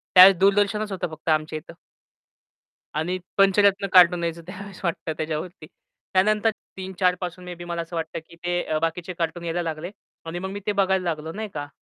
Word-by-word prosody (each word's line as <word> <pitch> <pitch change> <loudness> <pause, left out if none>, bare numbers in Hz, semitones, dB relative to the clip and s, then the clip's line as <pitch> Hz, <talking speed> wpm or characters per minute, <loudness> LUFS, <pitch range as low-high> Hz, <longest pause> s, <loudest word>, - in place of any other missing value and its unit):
त्यावेळेस 185 +1 +10
दूरदर्शनच 205 +2 +2
होतं 180 -2 -2
फक्त 155 +1 -9
आमच्या 155 0 +1
इथं. 170 +2 -13 1.2
आणि 170 +5 -1 0.2
पंचरत्न 200 0 +4
कार्टून 180 -1 +7
यायचं 170 0 -3
त्यावेळेस 195 0 -9
वाटतं 165 -2 -1
त्याच्यावरती. 155 +2 -4 0.5
त्यानंतर 215 +4 +4 0.3
3-4 185 -1 0
पासून 180 0 -5
मे 180 0 -6
बी 175 0 -9
मला 170 -1 -3
असं 165 +1 -8
वाटतं, 160 -1 -3
की 170 - -15
ते 175 -3 0
बाकीचे 165 +2 -2
कार्टून 170 +1 -2
यायला 170 +1 -1
लागले. 165 +1 -4 0.4
आणि 165 +2 -4
मग 190 +1 -4
मी 200 +1 -5
ते 210 - +2
बघायला 190 -2 +2
लागलो 160 -2 -3
नाही 215 +3 -5
का? 145 -1 -4
180 Hz, 180 wpm, -24 LUFS, 165-190 Hz, 1.2 s, त्यावेळेस